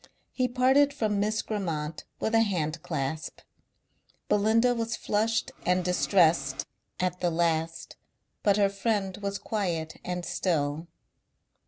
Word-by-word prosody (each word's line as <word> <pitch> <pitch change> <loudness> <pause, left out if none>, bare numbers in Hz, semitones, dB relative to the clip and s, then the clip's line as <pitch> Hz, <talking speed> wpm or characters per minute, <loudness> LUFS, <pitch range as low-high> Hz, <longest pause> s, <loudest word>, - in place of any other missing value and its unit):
He 255 -1 +1
parted 265 +3 +3
from 215 -6 0
Miss 215 +2 0
Grammont 165 -7 -3
with 220 - -1
a 225 - +5
hand 170 -7 -1
clasp. 145 +3 -4 0.9
Belinda 225 +4 +4
was 230 -1 -2
flushed 225 +4 0
and 180 0 +1
distressed 170 -6 +2 0.3
at 180 0 -1
the 175 - +1
last 165 -1 -1 0.4
but 200 -2 +3
her 200 -1 +4
friend 195 -1 -1
was 200 -1 -3
quiet 170 -8 -2
and 180 -1 -3
still. 155 -2 -1
195 Hz, 125 wpm, -28 LUFS, 165-220 Hz, 0.9 s, a